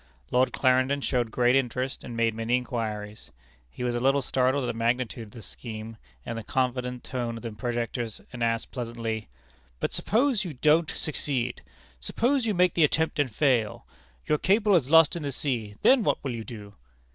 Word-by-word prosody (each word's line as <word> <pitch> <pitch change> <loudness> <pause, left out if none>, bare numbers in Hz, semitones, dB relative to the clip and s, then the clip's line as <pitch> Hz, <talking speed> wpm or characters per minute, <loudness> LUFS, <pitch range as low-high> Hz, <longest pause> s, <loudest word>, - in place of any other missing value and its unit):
Lord 125 +1 +3
Clarendon 130 +2 +2
showed 125 -4 0
great 125 +2 +3
interest, 130 0 -1
and 120 -2 -7
made 115 -1 +2
many 115 +2 +1
inquiries. 110 -4 -4 0.4
He 95 - -7
was 120 -1 0
a 120 - -1
little 135 +2 +2
startled 130 +2 +1
at - - -1
the - - -1
magnitude 115 0 -1
of - - -17
the 115 - -10
scheme, 110 +2 -7 0.3
and 115 - -4
the - - -8
confident 125 0 -1
tone 120 -3 -3
of 115 - -10
the 115 - -4
projectors, 120 0 -3
and 120 -1 -3
asked 115 -1 0
pleasantly: 115 -3 -4 0.5
"But, - - -2
suppose 235 0 +2
you 175 -5 -5
don't 155 +4 +3
succeed? 130 -5 -2 0.4
Suppose 240 - 0
you 210 - +1
make 180 0 +4
the 170 - +3
attempt 160 +1 +2
and 145 -3 +2
fail 120 -3 +1 0.4
your 150 - +1
cable 205 +2 +3
is 140 -6 +2
lost 165 +1 +6
in 170 - -4
the 145 -1 -3
sea 120 -7 -3
then 265 -1 +6
what - - +2
will 135 -3 -2
you 115 -1 -5
do?" 105 -4 -9
125 Hz, 190 wpm, -27 LUFS, 115-145 Hz, 0.5 s, lost